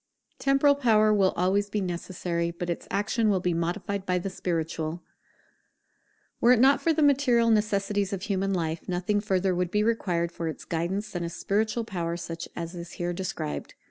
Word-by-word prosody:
[Temporal 275 +1 +4
power 220 -6 +4
will 195 -2 +4
always 195 +3 +1
be 210 - -1
necessary, 175 -2 -2
but 170 +1 -4
its 170 - -5
action 215 +3 +1
will 195 -2 +2
be 180 -1 0
modified 175 +4 -2
by 180 -1 0
the 185 +2 -3
spiritual] 165 -2 -3 1.4
Were 240 - +5
it 240 - +3
not 270 +3 +5
for 330 - +2
the 315 -1 +2
material 255 -5 +4
necessities 205 -2 +1
of 190 -2 -4
human 195 -1 0
life, 165 -3 -2
nothing 180 +3 0
further 190 -2 +1
would 180 0 0
be 210 +3 +1
required 180 -7 0
for 170 -1 -4
its 160 - -6
guidance 190 +6 -2
than 175 -2 -3
a 170 - -2
spiritual 215 +6 -1
power 170 -6 -3
such 170 -1 -6
as 170 0 -5
is 175 -1 -8
here 175 0 -2
described. 170 - -4
190 Hz, 180 wpm, -27 LUFS, 170-215 Hz, 1.4 s, Were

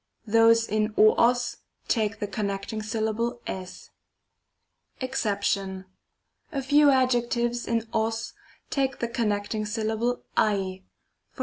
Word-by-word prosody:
Those 230 +1 +5
in 215 0 0
o 215 0 +7
og 240 +1 +4 0.5
take 215 -3 0
the - - -1
connecting 200 +1 -3
syllable 220 +2 -2
tg. 185 -1 -7 1.1
JExcep. 200 -7 -1 0.7
A 280 -4 -2
few 290 +2 +5
adjectives 240 -2 +1
in 230 -1 0
og 220 0 +1 0.6
take 270 -2 0
the 235 - -2
connecting 215 -2 -1
syllable 220 +3 -1
ac. 210 -2 +3 0.8
JEx. - - -17
225 Hz, 110 wpm, -26 LUFS, 210-240 Hz, 1.1 s, o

